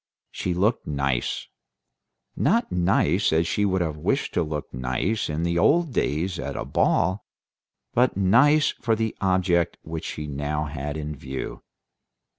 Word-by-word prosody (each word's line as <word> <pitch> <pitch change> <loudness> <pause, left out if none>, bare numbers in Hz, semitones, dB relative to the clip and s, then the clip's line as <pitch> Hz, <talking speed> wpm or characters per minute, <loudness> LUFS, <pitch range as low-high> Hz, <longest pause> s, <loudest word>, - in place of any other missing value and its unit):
She 90 -1 -2
looked 105 +6 +1
nice. 70 -4 -1 0.9
Not 230 +4 +1
nice 90 +1 +2
as 80 +1 +3
she 105 +5 0
would 95 -2 +1
have 80 -3 -2
wished 75 - -1
to - - +1
look 75 -2 -4
nice 65 - -1
in 80 +2 -1
old 165 - +3
days 90 +3 -1
at 70 +1 -4
a - - -3
ball, 95 +3 +1 0.7
but 125 -4 +2
nice 130 +11 +5
for 115 -2 -1
the 110 0 -2
object 90 -3 +2
which 80 0 -6
she 75 - -5
now 75 +1 -2
had 75 0 -4
in 75 0 -4
view. 65 -1 -6
85 Hz, 145 wpm, -25 LUFS, 75-100 Hz, 0.9 s, nice